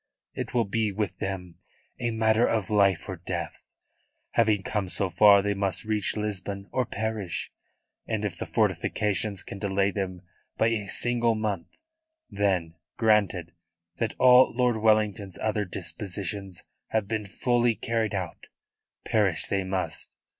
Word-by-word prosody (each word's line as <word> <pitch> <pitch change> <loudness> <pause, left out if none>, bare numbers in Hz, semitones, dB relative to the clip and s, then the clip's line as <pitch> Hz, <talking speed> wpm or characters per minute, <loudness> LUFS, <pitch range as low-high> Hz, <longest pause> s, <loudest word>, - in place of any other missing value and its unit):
It - - -5
will 120 -2 +3
be 105 +1 0
with 105 +1 -3
them 90 -3 -5 0.4
a 120 -2 0
matter 110 +1 +3
of 110 -2 -1
life 100 -4 +3
or 95 - -5
death. 85 -1 -6 0.6
Having 110 -4 +2
come 100 -1 -2
so 95 0 0
far 100 +3 +7
they 100 0 +1
must 100 -2 -1
reach 110 -1 0
Lisbon 100 -1 -4
or 130 -3 0
perish; 110 -4 -3 0.6
and 110 -1 -1
if 95 -5 -3
the - - -6
fortifications 105 -2 0
can 100 - -8
delay 100 -1 +1
them 95 -3 -4 0.3
by 110 - +3
a 105 -3 -2
single 120 +2 +4
month, 105 -5 -2 0.6
then, 95 -5 0 0.2
granted 100 -7 +2 0.4
that 115 -2 -2
all 125 0 +7
Lord 125 -2 +2
Wellington's 105 -3 +1
other 105 -1 -1
dispositions 95 +1 -5 0.2
have 110 -3 -1
been 105 -1 -2 0.2
duly 120 -2 +3
carried 110 -2 -1
out, 90 -3 -5 0.6
perish 105 -6 +2
they 100 -1 0
must. 95 0 -3
105 Hz, 140 wpm, -27 LUFS, 95-110 Hz, 0.6 s, far